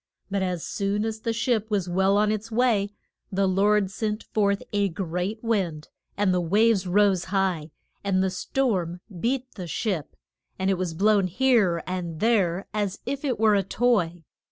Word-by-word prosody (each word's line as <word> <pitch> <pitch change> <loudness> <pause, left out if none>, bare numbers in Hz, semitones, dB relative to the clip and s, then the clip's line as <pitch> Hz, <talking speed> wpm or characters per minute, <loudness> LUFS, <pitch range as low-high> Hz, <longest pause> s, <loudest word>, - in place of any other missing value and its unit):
But 200 0 0
as 180 -3 -2
soon 200 +2 -1
as 220 -1 -3
the 230 - -2
ship 225 -1 0
was 200 -4 0
well 190 +3 +2
on 210 0 +3
its 215 0 -3
way, 220 -4 +2 0.4
the 195 0 +1
Lord 195 +1 +2
sent 215 +1 -3
forth 200 -2 0
a 200 -1 +2
great 180 +5 -3
wind, 185 -10 -1 0.3
and 200 -2 +2
the 180 - +1
waves 200 +2 +3
rose 195 -1 +3
high, 185 -5 0 0.3
and 190 -1 +1
the 190 - 0
storm 185 -5 -1 0.2
beat 255 +4 -1
the 180 -4 -7
ship, 170 -2 -3 0.4
and 190 +1 +1
it 190 - +1
was 175 -3 -2
blown 200 +1 +3
here 200 -5 +2
and 175 -3 -4
there 195 -5 +2
as 205 -2 -1
if 275 +2 -3
it 260 -7 -1
were 220 -1 +5
a 200 - +4
toy. 185 -5 0
200 Hz, 175 wpm, -25 LUFS, 180-215 Hz, 0.4 s, were